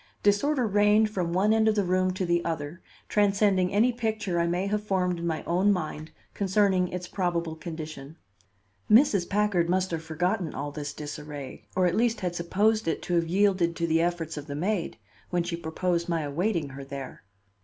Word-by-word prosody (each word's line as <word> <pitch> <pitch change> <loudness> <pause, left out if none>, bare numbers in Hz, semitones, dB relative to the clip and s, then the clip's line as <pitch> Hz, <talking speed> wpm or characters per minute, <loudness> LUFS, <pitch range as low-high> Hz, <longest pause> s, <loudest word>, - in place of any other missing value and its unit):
Disorder 250 +6 +2
reigned 210 +1 +3
from 180 -5 -2
one 195 +5 +3
end 220 0 +3
of 215 - +3
the 205 - +2
room 185 0 +1
to 185 - -1
the 175 0 +1
other, 165 +1 -4 0.3
transcending 200 -3 +2
any 230 +5 +3
picture 215 -6 -1
I 170 - +2
may 175 +3 0
have 210 +1 -1
formed 180 -4 0
in 170 - -3
my 160 -2 -2
own 185 +4 +2
mind 155 -4 -3 0.2
concerning 195 -2 +2
its 180 0 -5
probable 170 -4 -2
condition. 155 -2 -8 0.7
Mrs. 215 -6 +5
Packard 200 -4 +1
must 185 0 +1
have 165 -1 -2
forgotten 175 +3 -1
all 145 +1 -4
this 145 -1 -5
disarray, 145 -2 -8
or 185 0 +3
at 175 - +2
least 230 -1 +1
had 180 -2 -1
supposed 205 +5 +1
it 165 - -1
to 175 - -3
have 170 -1 +2
yielded 185 -2 +2
to 170 - -1
the 165 0 +2
efforts 170 -2 -2
of 150 +1 -7
the 140 - -5
maid, 180 +3 -1 0.3
when 175 -1 0
she 170 0 -3
proposed 170 +1 -2
my 165 -1 0
awaiting 160 +2 -1
her 135 0 -8
there. 135 -1 -8
180 Hz, 190 wpm, -27 LUFS, 165-205 Hz, 0.7 s, Mrs